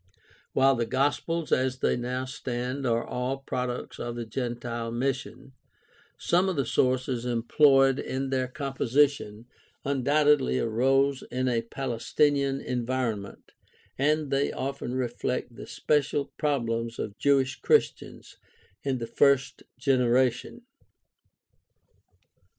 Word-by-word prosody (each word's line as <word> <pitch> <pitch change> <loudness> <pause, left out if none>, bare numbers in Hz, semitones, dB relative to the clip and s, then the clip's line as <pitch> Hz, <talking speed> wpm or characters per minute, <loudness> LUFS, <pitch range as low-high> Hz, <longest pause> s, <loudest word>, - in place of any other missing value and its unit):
While 135 +1 +4
the 120 -2 -1
Gospels 145 +6 -1
as 130 0 +1
they - - +1
now 125 +1 -3
stand 130 0 -4
are 115 0 +1
all 125 +2 -2
products 125 -2 -4
of 120 0 -4
the 120 -1 -4
gentile 120 0 -4
mission, 130 +2 -3 0.7
some 180 +3 +2
of 185 - -2
the 140 -3 0
sources 125 0 0
employed 135 +3 +4
in 135 +1 -3
their 130 -1 0
composi 135 0 +2
tion 115 -5 -10 0.4
undoubtedly 140 - +2
arose 135 - +2
in 130 +1 -1
a 120 -2 +1
Palestinian 135 +3 0
environment, 120 -4 -3 0.4
and 150 +1 +1
they 140 +1 +1
often 135 -2 -4
reflect 125 -1 -3
the - - -9
special 145 -1 0
problems 115 -5 -1
of 100 +1 -5
Jewish 135 -2 +2
Christians - - 0 0.4
in 135 -2 -1
the 115 - -4
first 140 +1 +2 0.2
generation. 130 - +1
130 Hz, 115 wpm, -27 LUFS, 120-140 Hz, 0.7 s, While